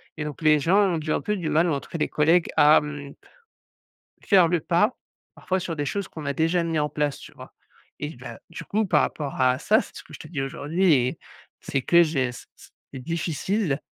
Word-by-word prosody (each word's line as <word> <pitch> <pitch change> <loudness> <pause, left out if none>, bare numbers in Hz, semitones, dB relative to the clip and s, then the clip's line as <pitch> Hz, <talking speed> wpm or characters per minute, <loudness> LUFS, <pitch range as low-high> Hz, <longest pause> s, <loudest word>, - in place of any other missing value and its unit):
et 155 - -4
donc 150 0 -7
les 155 -1 +5
gens 175 +7 +2 0.2
ont - - -1
du 155 0 -4
un - - 0
peu 210 0 -1
du 165 -5 -3
mal 160 +3 +2
ou, 155 - +1
en 140 - -1
tous - - -16
cas, - - -5
les 150 - 0
collègues 165 +3 +3
à, 150 +1 +7
mmh 145 -1 -7 1.1
faire 185 -5 +5
le 175 -1 +1
pas, 210 - +1 0.4
parfois, 185 0 -2
sur 165 -3 -4
des 145 - -2
choses 200 +4 -3
qu'on 155 -3 -8
a 140 - 0
déjà 165 +3 +1
mis 165 -2 -1
en 150 0 0
place, 150 -2 -2
tu - - -13
vois? - - -13 0.5
Et 150 0 -5
bah, 120 -2 -10
du - - -8
coup, 215 0 -1
par - - +3
rapport 140 -3 -4
à 130 0 +3
ça, - - +3
c'est - - -11
ce - - -8
que - - -17
je - - -9
te 150 - -10
dis 140 -5 -3
aujourd'hui 160 +6 0
et 125 -1 0 0.4
c'est 135 - -2
que 170 +4 +5
j'ai 150 -6 0
s 125 - -10 0.5
c'est 130 - -7
difficile, 165 - -2
155 Hz, 235 wpm, -24 LUFS, 145-175 Hz, 1.1 s, à